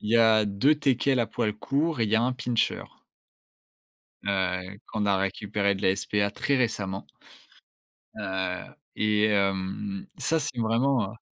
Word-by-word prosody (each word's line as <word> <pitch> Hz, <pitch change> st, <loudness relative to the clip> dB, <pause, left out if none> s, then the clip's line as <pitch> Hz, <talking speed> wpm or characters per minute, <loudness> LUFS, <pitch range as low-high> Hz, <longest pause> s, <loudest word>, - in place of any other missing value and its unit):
il 105 Hz, -, -4 dB
y 115 Hz, -, +5 dB
a 110 Hz, -2 st, +5 dB
2 105 Hz, +10 st, +3 dB
Teckels 135 Hz, -2 st, +2 dB
à 120 Hz, -, +2 dB
poil 105 Hz, -, -1 dB
court 140 Hz, +7 st, -1 dB
et -, -, +4 dB
il 105 Hz, -, -2 dB
y -, -, +3 dB
1 120 Hz, +3 st, +3 dB
Pinscher. 125 Hz, -2 st, -1 dB, 1.4 s
Heu, 95 Hz, 0 st, -1 dB
qu'on 105 Hz, -1 st, -2 dB
a 100 Hz, -1 st, +3 dB
récupéré 100 Hz, +1 st, 0 dB
de -, -, -8 dB
la -, -, +4 dB
SPA, 100 Hz, +1 st, 0 dB
très 140 Hz, +6 st, 0 dB
récemment 100 Hz, -6 st, -1 dB, 1.1 s
heu, 95 Hz, -1 st, -3 dB, 0.2 s
et 105 Hz, 0 st, +2 dB
hem, 100 Hz, -, -1 dB
ça, 165 Hz, -, +1 dB
c'est 145 Hz, -5 st, -3 dB
vraiment, 115 Hz, -1 st, +1 dB
heu 115 Hz, -, -14 dB
105 Hz, 155 wpm, -27 LUFS, 100-125 Hz, 1.4 s, y